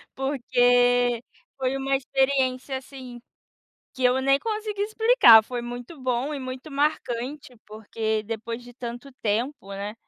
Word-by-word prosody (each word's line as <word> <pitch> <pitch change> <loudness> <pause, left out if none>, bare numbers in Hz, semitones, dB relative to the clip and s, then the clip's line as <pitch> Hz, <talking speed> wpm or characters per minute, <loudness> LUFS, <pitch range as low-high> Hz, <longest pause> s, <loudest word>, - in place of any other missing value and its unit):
porque 245 -2 +2 0.3
foi 265 0 -1
uma 270 0 0
experiência, 265 0 0
assim, 255 -2 -10 0.8
que 260 -2 -3
eu 250 +1 +4
nem 275 +1 +3
consigo 425 0 -4
explicar, 435 - +6
foi 240 +1 -5
muito 245 +5 -8
bom 255 +4 -1
e - - -4
muito 260 +3 -7
marcante, 275 -2 -2
porque 220 0 -3
depois 230 +2 -5
de 245 0 -14
tanto 245 +2 -7
tempo, 220 0 -2
né, 200 +2 -5
255 Hz, 130 wpm, -25 LUFS, 240-275 Hz, 0.8 s, explicar